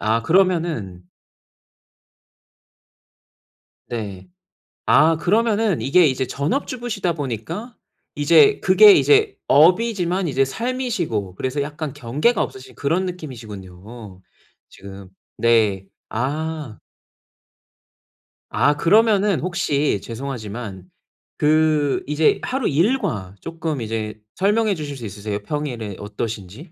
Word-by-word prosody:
아 110 +2 +1
그러면은 160 - 0 2.8
네. 100 -6 -6 0.6
아 160 +1 +4
그러면은 215 0 +1
이게 165 +6 +4
이제 130 0 -1
전업주부시다 215 - -2
보니까 160 - -5 0.4
이제 165 - +5
그게 420 -2 +7
이제 425 +2 +3
업이지만 180 +2 +3
이제 135 -1 +1
삶이시고 180 - -3
그래서 130 +6 -2
약간 150 0 -5
경계가 145 - 0
없으신 130 0 -6
그런 165 +7 0
느낌이시군요, 110 - -9 0.5
지금. 95 -1 -12 0.3
네. 105 -5 +2 0.2
아. 150 +1 -3 1.7
아 145 - +2
그러면은 205 +3 +3
혹시 150 - -1
죄송하지만 110 -6 -6 0.5
그 150 -2 +2
이제 150 +1 +2
하루 260 -1 -1
일과 155 - 0
쪼끔 160 -5 -4
이제 110 -1 -4 0.2
설명해 210 +2 +1
주실 145 -4 -6
수 120 - -8
있으세요, 105 +1 -5
평일에 120 -8 -4
어떠신지? 105 - -6
145 Hz, 230 characters per minute, -21 LUFS, 110-180 Hz, 2.8 s, 그게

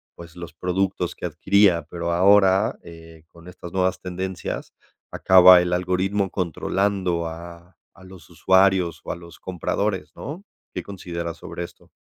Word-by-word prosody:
pues, 85 0 -13
los 85 -1 -9
productos 90 0 -2
que - - -7
adquiría, 90 -1 +2
pero 85 -1 -3
ahora, 95 +2 +4
eh, 80 -1 -14
con 85 +1 -17
estas 90 -1 -10
nuevas 95 0 0
tendencias, 95 0 -5 0.4
acaba 90 -1 +7
el 90 0 -2
algoritmo 95 +2 0
controlando 90 0 -1
a 85 +2 -10 0.2
a - - -16
los 95 -3 -14
usuarios 95 0 +2
o - - -3
a - - -7
los 85 -1 -14
compradores, 95 +2 -3
¿no? 160 +8 -7 0.3
¿Qué - - -4
consideras 85 -4 -6
sobre 85 - -7
esto? 85 - -13
90 Hz, 145 wpm, -23 LUFS, 85-95 Hz, 0.4 s, acaba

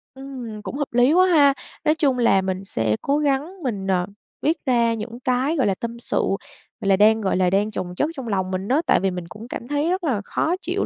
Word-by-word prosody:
Ừm, 255 -5 -8
cũng 250 - -6
hợp 290 -4 -3
lý 245 +4 +4
quá 365 +2 +6
ha! 290 -6 +5 0.3
Nói 305 0 +4
chung 280 -5 +1
là 230 -5 +4
mình 190 0 -3
sẽ 110 - 0
cố 280 +1 +1
gắng 300 +5 -1
mình, 205 -7 -3
ờ, 180 -2 +1 0.4
viết 320 +3 +1
ra 235 -3 +3
những 230 +2 -6
cái, 255 +4 0
gọi 265 -8 +2
là, 195 - +1
tâm 235 +3 -6
sự, - - -2 0.6
gọi 200 - -1
là, 195 - +6
đang, 220 +3 +4
gọi 195 -3 0
là, 185 -1 +3
đang 200 +3 +1
chồng 180 -3 -5
chất 295 - 0
trong 265 -3 -6
lòng 190 -3 -1
mình 190 +1 -3
á, 275 +7 +2
tại - - +4
vì 195 +1 0
mình 180 -2 -6
cũng 215 +6 -10
cảm 240 - -7
thấy 290 +3 0
rất 370 +1 -1
là 255 -10 0
khó 330 - 0
chịu - - -1
235 Hz, 250 wpm, -22 LUFS, 195-285 Hz, 0.6 s, quá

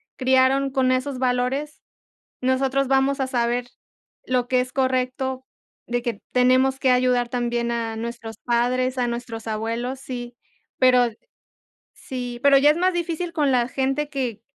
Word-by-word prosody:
criaron 260 +1 +3
con 260 -1 +2
esos 255 +1 -2
valores, 255 +4 -1 0.6
nosotros 265 +1 +1
vamos 270 +1 +2
a 265 - 0
saber 245 -1 0 0.6
lo 250 -1 0
que 255 0 +2
es 255 0 -6
correcto, 260 0 -1 0.4
de 245 0 -2
que 235 -4 -4
tenemos 255 +1 +3
que 265 - +2
ayudar 250 -1 +2
también 240 -1 -1
a 230 -1 -2
nuestros 230 -1 -6
padres, 250 +2 +1
a 250 - +1
nuestros 235 -1 -5
abuelos, 230 +4 -3
sí. 245 -2 -7 0.4
Pero 250 -1 +5 0.9
Sí. 245 -2 -6
Pero 280 -1 +6
ya 290 +2 +6
es 310 - -2
más 365 +1 +2
difícil 345 0 -2
con 295 -4 +1
la 245 -2 +2
gente 270 +3 -1
que 250 -7 -3
255 Hz, 150 wpm, -23 LUFS, 240-270 Hz, 0.9 s, Pero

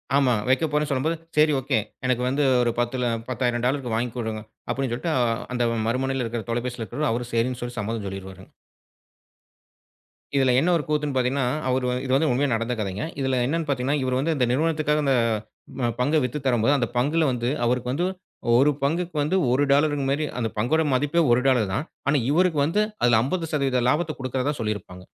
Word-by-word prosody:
ஆமாங்க. 125 -6 +2
வைக்கப்போறேன் 150 +2 +1
சொல்லும்போது, 150 +4 0 0.2
சரி 155 0 +5
ஓகே. 130 -3 0 0.3
எனக்கு 125 -1 +1
வந்து 140 +3 +1 0.2
ஒரு 120 - +1
10ல்ல, 120 0 0 0.2
$10,000 125 0 -1
வாங்கி 120 +2 -1
கொடுங்க 110 -2 -3 0.3
அப்படின்னு 135 -2 -1
சொல்லிட்டு 160 +7 -2 0.4
அந்த 120 -1 0
ம 115 - -2
மறுமுனையில 130 +2 0
இருக்கிற 115 0 -4
தொலைபேசியில 120 0 -2
இருக்றவரும், 150 +5 -2
அவர் 120 +1 -3
சரின்னு 120 +2 0
சொல்லிச் 120 -1 -5
சம்மதம் 110 -1 -3
சொல்லிர்வாரு. 95 -1 -8 1.9
இதுல 135 -2 +4
என்ன 165 +6 +2
ஒரு 155 - -3
கூத்துன்னு 150 -2 -1
பாத்தீங்கன்னா, 130 +1 +1 0.2
அவர் 130 0 +1
வந் 125 0 -1
இது 130 - -3
வந்து 155 +3 +2
உண்மையா 135 +3 +1
நடந்த 115 +2 -1
கதங்க. 100 +2 -3
இதுல 130 -2 +1
என்னன்னு 160 +4 -1
பாத்தீங்கன்னா, 135 +1 0
இவரு 130 0 0
வந்து 160 +4 +1
இந்த 130 -3 +2
நிறுவனத்துக்காக 150 +1 +1
அந்தப் 130 -4 +3 0.6
ப 120 -2 +1
பங்க 145 +5 +2
வித்துத் 130 +3 -4
தரும்போது 125 +1 +3
அந்தப் 120 -3 -2
பங்குல 150 +7 +2
வந்து 120 -1 -1 0.2
அவருக்கு 125 +1 0
வந்து 165 +7 0 0.5
1 140 +4 +5
பங்குக்கு 170 +4 -1
வந்து 150 +6 0 0.2
1 130 +3 +3
டாலர் 145 +2 +4 0.2
மாரி 145 +3 0
அந்தப் 115 -3 -3
பங்கோட 130 +9 +2
மதிப்பே 145 +6 +2
1 120 +1 +4
டாலர் 125 -6 +3
தான். 135 +10 -1 0.2
ஆனா 145 +1 +3
இவருக்கு 170 -1 +2
வந்து 170 +8 +1 0.2
அதில 120 -2 +5
50% 140 -4 0
லாபத்த 155 +3 0
கொடுக்கிறதா 130 +2 -1
சொல்லியிருப்பாங்க. 105 -4 -4
130 Hz, 175 wpm, -24 LUFS, 120-145 Hz, 1.9 s, சரி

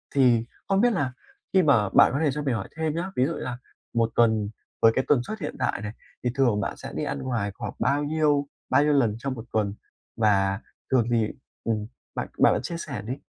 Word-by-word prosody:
Thì 120 -4 +4 0.2
không 195 +1 +3
biết 240 -1 +4
là 135 -8 -1 0.4
khi 190 - +6
mà 115 -9 +4
bạn - - +6
có 140 - 0
thể 145 - +3
cho 150 +2 -3
mình 130 -4 +1
hỏi - - -4
thêm 160 -1 -1
nhá, 180 +3 -3
ví 125 - +3
dụ 160 - -1
như - - -5
là 120 -1 -4 0.4
một 115 -1 +2
tuần, 110 -3 +3 0.3
với 115 - +7
cái 130 - +1
tần 130 -5 +4
suất 215 - -6
hiện - - -4
tại 130 -6 0
này, 105 - -4 0.3
thì 125 - +1
thường 120 -6 +3
bạn - - -3
sẽ - - -8
đi - - -2
ăn - - -2
ngoài 115 -6 -2
khoảng - - -5
bao 140 +4 +2
nhiêu 145 -2 +2 0.2
bao 145 - +5
nhiêu 150 0 +3
lần 120 -7 +3
trong 135 +1 -2
một 115 -2 -8
tuần 105 -2 +1 0.4
và 95 -2 +3 0.3
thường 120 -3 +3
thì 115 -2 +3 0.4
ừm, 110 -2 -1 0.3
bạn - - -2
bạn - - +7
bạn - - -1
chia 170 - -4
sẻ 140 -10 -5
đi. 125 +7 -4
125 Hz, 240 wpm, -26 LUFS, 110-145 Hz, 0.4 s, với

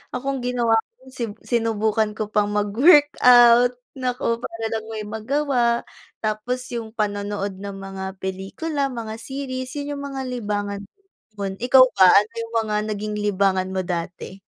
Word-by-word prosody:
Ako 275 +1 -2
ang - - -7
ginawa 245 -2 +1
ko - - -11 0.2
si 255 - -4 0.2
sinubukan 220 -2 0
ko 215 - -1
pang 205 -1 +2
mag-workout, 245 - +5 0.2
naku, 250 -3 -2
para 225 -2 -6
lang 220 -1 -3
may 220 -1 -5
magawa. 235 +2 0 0.4
Tapos 230 +4 -2
yung 225 -1 -5
panonood 205 -2 -2
ng 200 -1 -6
mga 195 0 -7
pelikula, 200 - -3
mga 225 -3 -6
series. 260 0 -5
Yun 285 0 -4
yung 280 - -6
mga 270 - -3
libangan 205 -5 -3
ko 200 - -15 0.5
noon. 195 -1 -2
Ikaw 255 +1 +7
ba, 185 -2 +7
ano 205 +3 +5
yung 230 0 -8
mga 210 - -2
naging 210 0 -3
libangan 195 -2 +1
mo 190 -1 -2
dati? 175 +2 -5
220 Hz, 155 wpm, -22 LUFS, 205-250 Hz, 0.5 s, Ikaw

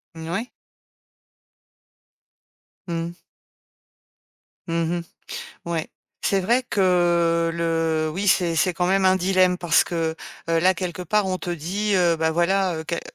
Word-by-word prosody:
Mmh 160 0 -8
n - - -6
ouais. 205 +8 -2 2.4
Mmh. 170 0 -4 1.5
Mmh 165 +1 0
mh. - - -4 0.7
Ouais, 165 -2 -2 0.4
c'est 195 - +2
vrai 235 +7 +2
que 175 -5 +2
le 165 -1 0
oui, 190 +6 -3
c'est 175 -3 +3
c'est 180 +3 +2
quand 175 +1 -1
même 190 +1 +2
un 185 0 +5
dilemme 185 -1 +2
parce 170 -3 +3
que, 165 -3 -2 0.3
heu, 165 0 +2
là, 185 +2 +5
quelque 180 -1 -5
part 205 +3 +1
on 185 -1 -1
te 180 - -5
dit, 185 +6 -2
heu: 175 -3 +3
«Bah 160 0 +1
voilà, 180 +2 +1
heu, 160 - -4
què», 170 - -2
heu, - - -4
175 Hz, 150 wpm, -23 LUFS, 165-185 Hz, 2.4 s, un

